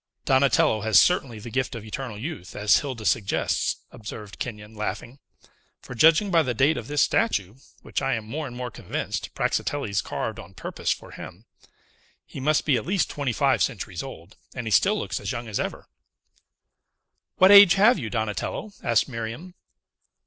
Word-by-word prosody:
"Donatello 130 Hz, -5 st, +3 dB
has 110 Hz, 0 st, +5 dB
certainly 140 Hz, -10 st, +2 dB
the 115 Hz, +2 st, -9 dB
gift 130 Hz, 0 st, -1 dB
of 115 Hz, -2 st, -8 dB
eternal 115 Hz, 0 st, -6 dB
youth, 120 Hz, -, -7 dB
as 105 Hz, 0 st, +4 dB
Hilda 130 Hz, -7 st, -6 dB
suggests," 105 Hz, -3 st, 0 dB
observed 105 Hz, -3 st, -9 dB
Kenyon, 105 Hz, -2 st, -6 dB
laughing; 115 Hz, +4 st, -5 dB, 0.6 s
"for, -, -, -10 dB
judging 165 Hz, -, +4 dB
by 165 Hz, -2 st, +5 dB
the 125 Hz, -5 st, -2 dB
date 145 Hz, +7 st, +3 dB
of -, -, -6 dB
this 145 Hz, 0 st, +2 dB
statue, 105 Hz, -, 0 dB, 0.3 s
which, -, -, -3 dB
I 135 Hz, -2 st, 0 dB
am 110 Hz, -1 st, -5 dB
more 145 Hz, +7 st, -4 dB
and 120 Hz, -, -9 dB
more 125 Hz, -1 st, -5 dB
convinced, -, -, -4 dB
Praxiteles 110 Hz, -9 st, -1 dB
carved -, -, -4 dB
on -, -, -12 dB
purpose -, -, -5 dB
for -, -, -2 dB
him, 100 Hz, +7 st, -10 dB, 0.8 s
he -, -, -9 dB
must 150 Hz, +3 st, +1 dB
be 140 Hz, -5 st, +3 dB
at -, -, -4 dB
least 185 Hz, -5 st, 0 dB
twenty 140 Hz, -3 st, -2 dB
five 115 Hz, -, +2 dB
centuries -, -, -2 dB
old, 85 Hz, +6 st, -11 dB, 0.2 s
and 125 Hz, -, -5 dB
he 110 Hz, -, -3 dB
still 205 Hz, -, +4 dB
looks -, -, -3 dB
as 100 Hz, -, -4 dB
young 120 Hz, -1 st, -5 dB
as 105 Hz, -, -3 dB
ever." -, -, -4 dB, 1.5 s
"What 185 Hz, +1 st, +7 dB
age 200 Hz, -2 st, +9 dB
have 210 Hz, +3 st, +5 dB
you, 115 Hz, -6 st, -4 dB
Donatello?" 110 Hz, -, -3 dB
asked 115 Hz, -2 st, +2 dB
Miriam. 120 Hz, +8 st, -6 dB
125 Hz, 175 wpm, -25 LUFS, 110-150 Hz, 1.5 s, age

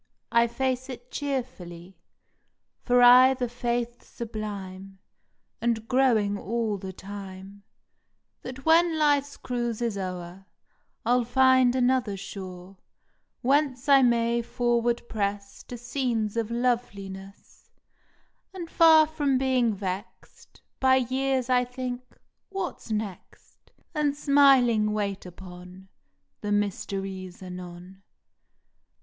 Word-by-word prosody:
" -, -, -52 dB
I 235 Hz, 0 st, +4 dB
face 260 Hz, +2 st, -2 dB
it 250 Hz, -1 st, -9 dB
cheerfully, 195 Hz, -, -5 dB, 0.9 s
For 245 Hz, 0 st, +3 dB
I 255 Hz, +2 st, +8 dB
ve 250 Hz, -1 st, -2 dB
a -, -, -4 dB
faith 240 Hz, 0 st, -3 dB
sublime, 195 Hz, -4 st, -7 dB, 0.6 s
And 230 Hz, -1 st, -1 dB
growing 225 Hz, -6 st, +2 dB
all 220 Hz, -1 st, -2 dB
the 190 Hz, 0 st, -6 dB
time, 195 Hz, 0 st, -10 dB, 0.8 s
That 260 Hz, +1 st, -9 dB
when 330 Hz, 0 st, +4 dB
life 290 Hz, -2 st, +3 dB
s 285 Hz, -, -13 dB
cruise 240 Hz, -3 st, -3 dB
is 230 Hz, -4 st, -2 dB
o 185 Hz, -1 st, -3 dB
er 175 Hz, +2 st, -11 dB, 0.6 s
I 240 Hz, -, +3 dB
ll 250 Hz, 0 st, +3 dB
find 260 Hz, +1 st, +4 dB
another 250 Hz, -5 st, +1 dB
shore 185 Hz, -1 st, -9 dB, 0.7 s
Whence 270 Hz, 0 st, +1 dB
I 275 Hz, -1 st, +7 dB
may 235 Hz, -1 st, +2 dB
forward 240 Hz, 0 st, 0 dB
press 200 Hz, -1 st, -3 dB
To 245 Hz, -, -7 dB
scenes 240 Hz, -3 st, -2 dB
of 230 Hz, -2 st, -1 dB
loveliness, 200 Hz, -5 st, -4 dB, 0.9 s
And 340 Hz, -3 st, -7 dB
far 320 Hz, -1 st, +7 dB
from 295 Hz, -4 st, 0 dB
being 255 Hz, -3 st, +2 dB
vexed 190 Hz, -1 st, -8 dB, 0.2 s
By 260 Hz, -1 st, +4 dB
years, 260 Hz, 0 st, 0 dB
I 250 Hz, -1 st, +3 dB
think, 250 Hz, 0 st, -7 dB, 0.3 s
"What 385 Hz, -, -5 dB
next?" 210 Hz, -4 st, -7 dB, 0.2 s
And 290 Hz, -2 st, 0 dB
smiling 265 Hz, -7 st, +4 dB
wait 200 Hz, -3 st, -3 dB
upon 180 Hz, +1 st, -12 dB, 0.5 s
The 205 Hz, -, -3 dB
mysteries 195 Hz, -2 st, -3 dB
anon. 180 Hz, +1 st, -10 dB
235 Hz, 115 wpm, -26 LUFS, 195-260 Hz, 0.9 s, I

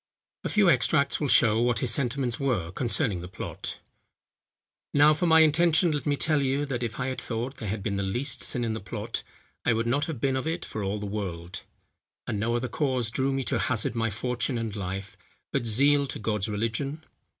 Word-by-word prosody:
A -, -, -2 dB
few 210 Hz, -3 st, +4 dB
extracts 150 Hz, -4 st, +3 dB
will 150 Hz, -, 0 dB
show 115 Hz, -3 st, +5 dB
what 120 Hz, 0 st, +2 dB
his 120 Hz, -3 st, +1 dB
sentiments 125 Hz, -1 st, -1 dB
were 115 Hz, -12 st, 0 dB
concerning 110 Hz, -, 0 dB
the 90 Hz, -, -7 dB
plot. 90 Hz, -, -6 dB, 1.2 s
"Now, 145 Hz, +2 st, +7 dB
for 175 Hz, +3 st, 0 dB
my 160 Hz, 0 st, +7 dB
intention 160 Hz, +2 st, +4 dB
let 145 Hz, -2 st, -2 dB
me 145 Hz, -, +2 dB
tell 150 Hz, 0 st, +2 dB
you, 135 Hz, +2 st, 0 dB
that 130 Hz, -4 st, -3 dB
if 115 Hz, -2 st, -4 dB
I 130 Hz, -, -1 dB
had 130 Hz, 0 st, -3 dB
thought 125 Hz, +4 st, -3 dB
there 110 Hz, -, -5 dB
had 100 Hz, 0 st, -3 dB
been 100 Hz, -2 st, -1 dB
the -, -, 0 dB
least 120 Hz, +8 st, -1 dB
sin 125 Hz, -, 0 dB
in 115 Hz, -1 st, -1 dB
the 110 Hz, -, -3 dB
plot, 100 Hz, -, -5 dB, 0.4 s
I -, -, +3 dB
would 115 Hz, +1 st, 0 dB
not 140 Hz, +6 st, +1 dB
have 155 Hz, -7 st, -5 dB
been 135 Hz, +2 st, +1 dB
of 130 Hz, +4 st, -2 dB
it 165 Hz, +2 st, -2 dB
for 110 Hz, -, -5 dB
all 100 Hz, +2 st, -1 dB
the 105 Hz, -, -5 dB
world; 95 Hz, -4 st, -5 dB, 0.6 s
and 105 Hz, -, -2 dB
no 115 Hz, +3 st, 0 dB
other 125 Hz, +2 st, -1 dB
cause 130 Hz, -5 st, -1 dB
drew 135 Hz, +2 st, 0 dB
me 135 Hz, 0 st, -1 dB
to -, -, 0 dB
hazard 115 Hz, -3 st, 0 dB
my 115 Hz, -1 st, 0 dB
fortune 125 Hz, +3 st, -1 dB
and 115 Hz, -2 st, -3 dB
life, 95 Hz, 0 st, -5 dB, 0.4 s
but 130 Hz, -4 st, -1 dB
zeal 140 Hz, +5 st, +4 dB
to -, -, -4 dB
God's 105 Hz, -1 st, -1 dB
religion. 115 Hz, +9 st, -2 dB
120 Hz, 215 wpm, -27 LUFS, 110-140 Hz, 1.2 s, Now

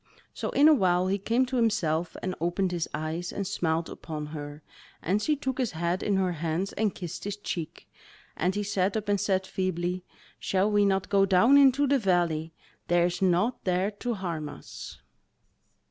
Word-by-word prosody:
So -, -, -3 dB
in 290 Hz, +2 st, +5 dB
a 315 Hz, -, +8 dB
while 185 Hz, -8 st, +2 dB
he 200 Hz, +1 st, 0 dB
came 230 Hz, +6 st, +1 dB
to 255 Hz, 0 st, -3 dB
himself 175 Hz, -8 st, 0 dB
and 185 Hz, -, -1 dB
opened 175 Hz, +2 st, 0 dB
his 175 Hz, -2 st, -2 dB
eyes 160 Hz, +3 st, -3 dB
and 200 Hz, -, -3 dB
smiled 165 Hz, -4 st, -1 dB
upon 155 Hz, -2 st, -6 dB
her, 150 Hz, 0 st, -8 dB, 0.4 s
and 195 Hz, +5 st, 0 dB
she 305 Hz, +7 st, +1 dB
took 265 Hz, -2 st, -4 dB
his 245 Hz, -7 st, 0 dB
head 170 Hz, +3 st, -1 dB
in 205 Hz, -, +1 dB
her 190 Hz, -1 st, +1 dB
hands 170 Hz, +3 st, -2 dB
and 215 Hz, -2 st, 0 dB
kissed 175 Hz, -4 st, -6 dB
his 205 Hz, 0 st, -4 dB
cheek, 170 Hz, -6 st, -6 dB, 0.5 s
and 180 Hz, +3 st, 0 dB
he 205 Hz, -, -1 dB
sat 195 Hz, 0 st, 0 dB
up 210 Hz, -1 st, -4 dB
and 205 Hz, -1 st, +1 dB
said 190 Hz, -2 st, +1 dB
feebly: 185 Hz, -1 st, -2 dB, 0.4 s
"Shall 195 Hz, +2 st, +1 dB
we 205 Hz, -1 st, +4 dB
not 195 Hz, -1 st, +1 dB
go 195 Hz, -1 st, +4 dB
down 195 Hz, +9 st, +5 dB
into 280 Hz, 0 st, +6 dB
the 280 Hz, 0 st, +3 dB
valley? 170 Hz, -5 st, +1 dB, 0.4 s
there 175 Hz, 0 st, +3 dB
is 175 Hz, +1 st, -2 dB
naught 190 Hz, +6 st, +1 dB
there 185 Hz, +2 st, +1 dB
to 235 Hz, +3 st, -3 dB
harm 170 Hz, -6 st, -4 dB
us." -, -, -10 dB
185 Hz, 190 wpm, -27 LUFS, 170-205 Hz, 0.5 s, a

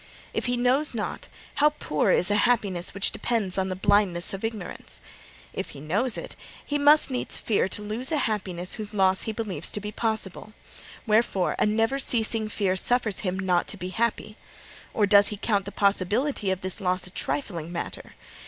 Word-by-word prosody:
If -, -, -2 dB
he 245 Hz, 0 st, 0 dB
knows 250 Hz, +3 st, +2 dB
not, 215 Hz, -, -4 dB, 0.3 s
how 300 Hz, 0 st, +5 dB
poor 150 Hz, -, 0 dB
is 185 Hz, +3 st, +3 dB
a -, -, +3 dB
happiness 200 Hz, -7 st, 0 dB
which 200 Hz, -, +2 dB
depends 205 Hz, -6 st, +1 dB
on 190 Hz, 0 st, 0 dB
the 185 Hz, -, -2 dB
blindness 190 Hz, -2 st, +2 dB
of 195 Hz, -, -6 dB
ignorance! 220 Hz, -5 st, -5 dB, 0.5 s
If -, -, -4 dB
he -, -, -8 dB
knows 205 Hz, -, 0 dB
it, -, -, -7 dB, 0.3 s
he 290 Hz, 0 st, -1 dB
needs 290 Hz, 0 st, +6 dB
must 250 Hz, -, -3 dB
fear 210 Hz, -4 st, +1 dB
to 210 Hz, -, -4 dB
lose 225 Hz, +7 st, -3 dB
a 310 Hz, -, +2 dB
happiness 190 Hz, -8 st, -2 dB
whose 215 Hz, -2 st, -6 dB
loss 190 Hz, -1 st, +3 dB
he -, -, 0 dB
believes 210 Hz, -8 st, -3 dB
to -, -, -2 dB
be 210 Hz, +1 st, -6 dB
possible. 215 Hz, -2 st, -3 dB, 0.5 s
Wherefore, 215 Hz, -4 st, +2 dB
a -, -, +3 dB
never 225 Hz, +5 st, +1 dB
ceasing 225 Hz, -3 st, +1 dB
fear 195 Hz, -3 st, 0 dB
suffers 230 Hz, -1 st, +1 dB
him 185 Hz, -2 st, -2 dB
not 185 Hz, -2 st, +1 dB
to 205 Hz, -, -5 dB
be 180 Hz, -1 st, -5 dB
happy. 220 Hz, +1 st, -2 dB, 0.5 s
Or 210 Hz, -, +2 dB
does 200 Hz, 0 st, +6 dB
he 210 Hz, -, -3 dB
count 200 Hz, -2 st, 0 dB
the 200 Hz, -, -6 dB
possibility 205 Hz, +4 st, +1 dB
of 190 Hz, -1 st, -1 dB
this 185 Hz, +1 st, -2 dB
loss 185 Hz, -1 st, 0 dB
a 185 Hz, -, -7 dB
trifling 175 Hz, -, -3 dB
matter? 170 Hz, -, -6 dB
210 Hz, 190 wpm, -26 LUFS, 185-230 Hz, 0.5 s, needs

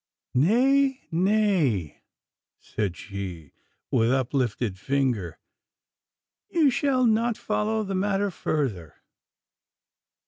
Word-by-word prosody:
'Nay, 265 Hz, -, +3 dB
nay,' 175 Hz, -, +1 dB, 0.6 s
said 95 Hz, -6 st, -3 dB
she, 95 Hz, -6 st, -7 dB, 0.4 s
with 115 Hz, +1 st, +3 dB
uplifted 125 Hz, -6 st, -1 dB
finger, 125 Hz, -, -1 dB, 1.1 s
'you 315 Hz, -5 st, +3 dB
shall 260 Hz, -1 st, +1 dB
not 230 Hz, 0 st, +2 dB
follow 220 Hz, +1 st, -1 dB
the 195 Hz, -1 st, -4 dB
matter 200 Hz, +1 st, 0 dB
further. 120 Hz, -, -3 dB
155 Hz, 80 wpm, -25 LUFS, -, 1.1 s, Nay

